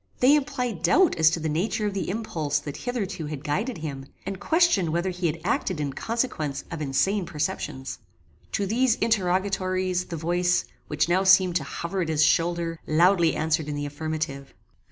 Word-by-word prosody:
They 265 +4 +6
implied 250 - -2
doubt 315 - +4
as 160 -1 +6
to 165 - -2
the 160 - -2
nature 205 +8 -1
of 205 - -1
the 195 - -3
impulse 165 -8 -1
that 145 -1 -5
hitherto 200 -10 -3
had 150 -2 -6
guided 190 - -1
him, 140 -4 -6 0.2
and 195 -1 -4
questioned 320 - +3
whether 170 +4 0
he 180 -1 -1
had 165 +1 -2
acted 185 - -1
in 140 -2 -2
consequence 225 - -2
of 165 -2 -5
insane 185 +9 +1
perceptions. 150 -5 -4 0.5
To 200 - 0
these 230 +4 +2
interrogatories 185 -3 0
the 170 - -6
voice, 175 +2 +1 0.2
which 150 +1 0
now 185 +2 +2
seemed 185 -2 +5
to 155 - -4
hover 170 +6 -4
at 165 - -2
his 155 0 +3
shoulder, 165 +1 +1
loudly 170 +1 +4
answered 155 -1 0
in 150 - -3
the 145 0 -3
affirmative. 145 -2 -4
175 Hz, 175 wpm, -25 LUFS, 155-195 Hz, 0.5 s, They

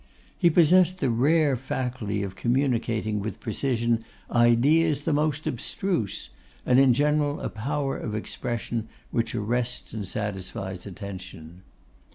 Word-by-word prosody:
He 175 - +4
possessed 175 +2 +5
the 130 - +1
rare 145 +4 +3
faculty 120 -5 -3
of 95 -1 -5
communicating 115 -3 0
with 110 +2 -5
precision 115 -1 0 0.3
ideas 135 +6 +4
the 155 +1 0
most 150 0 0
abstruse, 120 - -2 0.4
and 125 +1 +5
in 130 -3 +5
general 145 +1 +1
a - - -3
power 135 +5 -2
of 105 -3 -4
expression 115 +1 -3 0.2
which 115 0 -1
arrests 120 +3 -2
and 105 -3 -4
satisfies 95 -2 -4
attention. 90 -3 -9
120 Hz, 125 wpm, -26 LUFS, 110-145 Hz, 0.4 s, possessed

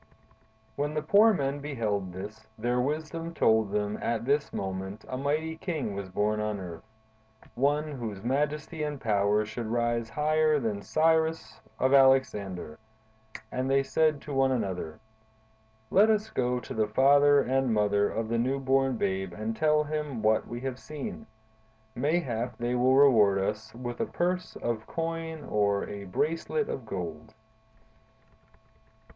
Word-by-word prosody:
"When 145 +2 -1
the 155 - -1
poor 205 +7 +6
men 140 -7 -1
beheld 110 -10 -2
this, 105 +4 -9
their 120 +3 0
wisdom 160 +4 -3
told 110 -2 +3
them 105 0 -1
that - - -6
at 115 -1 -1
this 145 +2 +1
moment 95 +1 -5
a 130 - -4
mighty 155 +4 -1
king 155 - -3
was 100 -1 -5
born 105 +3 0
on 105 -1 -2
earth: 85 -3 -8 0.7
one, 145 +4 +1
whose 110 -8 -6
majesty 150 +5 -1
and 150 -2 -3
power 105 -1 +2
should 110 +2 -5
rise 120 0 0
higher 155 +1 +2
than 110 -5 -2
that - - -7
of 100 - -13
Cyrus 160 +4 +1 0.2
or - - +1
of 130 - +3
Alexander; 110 - +3 0.7
and 130 +1 -2
they 135 0 +3
said 155 +1 +1
to 145 - -7
one 135 0 +3
another: 95 -10 -3 0.9
'Let 205 +3 +5
us 215 0 +1
go 125 -1 0
to 115 - -8
the 110 -1 +1
father 140 +5 +5
and 135 -2 +1
mother 105 -1 +2
of 115 0 -3
the 115 +1 0
new 130 +4 +1
born 135 -1 +1
babe 95 -3 -2
and 110 +3 -4
tell 150 +2 +3
them 150 -6 -4
what 110 0 +2
we 120 0 -6
have 130 -1 -4
seen! 205 +9 -7 0.7
Mayhap 125 -4 -1
they 120 +1 -1
will 125 +2 +3
reward 115 -8 +6
us 105 +3 -2
with 120 0 -6
a - - 0
purse 180 +1 -2
of 115 -2 -2
coin 165 -1 -4
or 100 -1 +1
a 100 -1 -7
bracelet 165 - -1
of 125 -4 -5
gold. 85 -2 -6
125 Hz, 160 wpm, -28 LUFS, 105-150 Hz, 0.9 s, poor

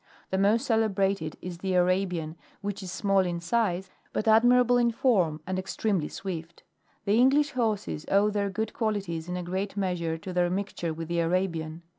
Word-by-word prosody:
The 190 - +1
most 215 +6 +3
celebrated 200 - +1
is 175 -1 -6
thetfra6mw, 180 -3 +1 0.3
which 205 0 -4
is 185 -2 -6
small 195 +1 +1
in 175 -2 0
size 185 0 0 0.2
but 215 - -2
admirable 245 +2 +5
in 240 -1 +3
form, 190 - +1
and 185 0 -2
extremely 190 -3 -1
swift. 170 -3 -7 0.4
The 210 +3 +3
English 280 +4 +4
horses 215 - -2
owe 205 +2 +4
their 200 -1 0
good 215 +3 -3
qualities 195 -7 -2
in 180 - -2
a 180 - -4
great 190 +3 -3
measure 175 -4 -1
to 185 +3 -7
their 175 0 +2
mixture 185 -3 -3
with 160 0 -5
the 170 0 -1
Arabian. 165 -2 -1
190 Hz, 170 wpm, -27 LUFS, 175-210 Hz, 0.4 s, admirable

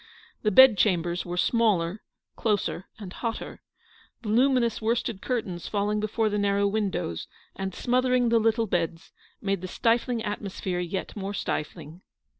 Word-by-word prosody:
The 215 - +2
bed 230 -1 +7
chambers 175 -3 +1
were 175 +1 -4
smaller, 205 -4 +2 0.3
closer, 205 -4 -1
and 195 -4 -8
hotter. 230 -2 -5 0.6
Voluminous 235 +1 +2
worsted 225 -2 -1
curtains 200 -9 -3
falling 210 0 0
before 215 +1 0
the 210 -1 0
narrow 200 0 +2
windows, 200 - -2 0.3
and 190 -1 -4
smothering 250 0 +2
the 230 0 +4
little 225 +1 +2
beds, 165 -4 -2 0.3
made 195 -2 0
the 185 - -5
stifling 235 +3 +1
atmosphere 195 -3 -3
yet 180 +2 -4
more 200 0 -4
stifling. 155 0 -4
205 Hz, 135 wpm, -26 LUFS, 185-230 Hz, 0.6 s, bed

